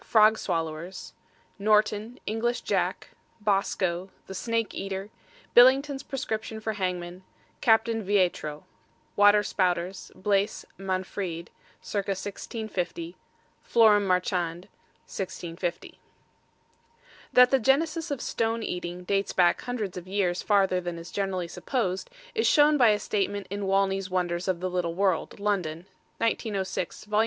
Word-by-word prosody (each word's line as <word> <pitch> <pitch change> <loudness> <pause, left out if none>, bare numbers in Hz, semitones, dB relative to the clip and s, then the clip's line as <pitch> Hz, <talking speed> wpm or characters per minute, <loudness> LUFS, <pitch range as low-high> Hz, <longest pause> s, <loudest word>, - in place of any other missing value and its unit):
FROG 215 0 +5
SWALLOWERS: 165 +1 -4 0.5
NORTON; 215 +3 +2
ENGLISH 230 +3 -1
JACK; - - -1 0.3
BOSCO, 195 -3 0 0.2
THE 190 - -8
SNAKE 230 +3 -1
EATER; 195 +1 -5 0.4
BILLINGTON'S 270 +3 +6
PRESCRIPTION 225 -6 -4
FOR 220 0 -2
HANGMEN; 180 -2 -3 0.4
CAPTAIN 225 -1 +3
VEITRO. 180 -7 0 0.5
WATER 205 0 +6
SPOUTERS: 180 -1 -1
BLAISE 200 +1 0
MANFREDE, 185 -2 -3 0.3
ca. - - -4
1650; 195 -3 -4 0.5
FLORAM 210 -3 +4
MARCHAND, 180 -2 0 0.4
1650. 175 -2 -5 1.3
That 250 0 +7
the 270 - +4
genesis 310 +6 +1
of 285 -4 -3
stone 225 0 -1
eating 180 -1 -4
dates 195 +2 0
back 175 -2 +3
hundreds 220 -7 -4
of 180 0 -7
years 185 -2 0
farther 195 -3 +2
than 175 -1 -4
is 165 0 -9
generally 190 -3 -2
supposed, 190 -1 -2 0.2
is 450 0 +1
shown 295 0 +5
by 245 -6 +6
a 210 - +4
statement 205 -1 -2
in 200 -1 -3
Wanley's 195 0 +1
Wonders 180 0 -1
of 180 -2 0
the 185 - -1
Little 175 -2 -1
World, 190 -2 0
London, 180 -5 -1 0.3
1906, 200 -6 -2
Vol. 210 0 +1
195 Hz, 120 wpm, -27 LUFS, 180-220 Hz, 1.3 s, That